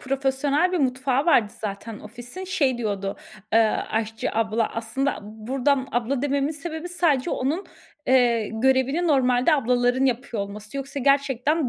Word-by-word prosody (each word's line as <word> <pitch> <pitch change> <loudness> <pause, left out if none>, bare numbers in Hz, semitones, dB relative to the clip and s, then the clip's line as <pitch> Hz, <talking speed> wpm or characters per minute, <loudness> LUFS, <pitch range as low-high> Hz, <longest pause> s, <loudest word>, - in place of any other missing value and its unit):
profesyonel 275 +5 +1
bir 360 - +1
mutfağı 260 +1 +1
vardı 225 -10 +4
zaten 210 +1 -5
ofisin. 245 - -9
Şey 280 -10 +1
diyordu, 200 -3 -2 0.4
eee, 225 - +6 0.3
aşçı 220 0 -2
abla, 225 0 +1
aslında 230 +5 -1
buradan 255 +6 -1
abla 245 +2 0
dememin 280 0 +1
sebebi 320 +3 -6
sadece 335 -5 +1
onun, 305 +9 -1 0.4
eee, 240 -4 +3
görevini 265 +8 +2
normalde 260 0 +3
ablaların 250 0 +2
yapıyor 240 -4 -1
olması. 210 +5 -8
Yoksa 275 +1 -4
gerçekten 275 +1 +2
260 Hz, 135 wpm, -24 LUFS, 230-280 Hz, 0.4 s, eee